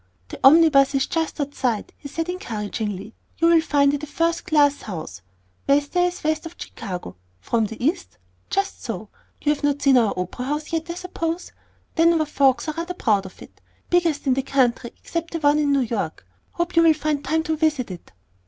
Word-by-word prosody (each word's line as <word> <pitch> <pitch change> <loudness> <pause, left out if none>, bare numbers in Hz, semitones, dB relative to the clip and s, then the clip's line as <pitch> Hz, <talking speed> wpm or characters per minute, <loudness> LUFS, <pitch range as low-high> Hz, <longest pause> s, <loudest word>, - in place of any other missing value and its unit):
"The - - -8
omnibus 280 -2 +6
is 270 - +2
just 325 -1 -2
outside," 265 -6 -2
he 285 - -10
said 330 +4 -3
encouragingly. 215 - -4 0.2
"You'll 335 0 +5
find 285 -3 +3
it 290 - -2
a 300 - -6
first 335 +3 -1
class 290 -2 +3
house, 155 - -7 0.5
best 285 +1 +2
there 355 0 +3
is 360 - -6
west 310 +1 -1
of 335 - -13
Chicago. 180 - -7 0.2
From 225 - 0
the 225 +3 -6
East? 350 +4 -1 0.3
Just 395 0 -1
so. - - -5 0.3
You've 295 -1 +1
not 290 -1 +1
seen 270 -3 +6
our 225 -3 +1
opera 180 +7 -4
house 295 +4 -3
yet, 325 +1 -2
I 340 - -3
suppose. 345 -1 -4 0.4
Denver 330 -1 +4
folks 270 -3 +2
are 310 - -1
rather 340 +3 -4
proud 205 - +1
of 185 - -13
it. - - -18 0.3
Biggest 335 -5 +2
in 265 - +3
the 270 - 0
country 250 -3 +1
except 335 0 -5
the - - 0
new - - -8
one 290 +1 +4
in 290 -1 +2
New 280 -1 +3
York. 210 - -3 0.3
Hope 345 0 -2
you'll 330 -1 +6
find 300 -1 -1
time 320 0 0
to 320 0 -1
visit 300 - 0
it." 175 - -10
290 Hz, 195 wpm, -23 LUFS, 245-330 Hz, 0.5 s, omnibus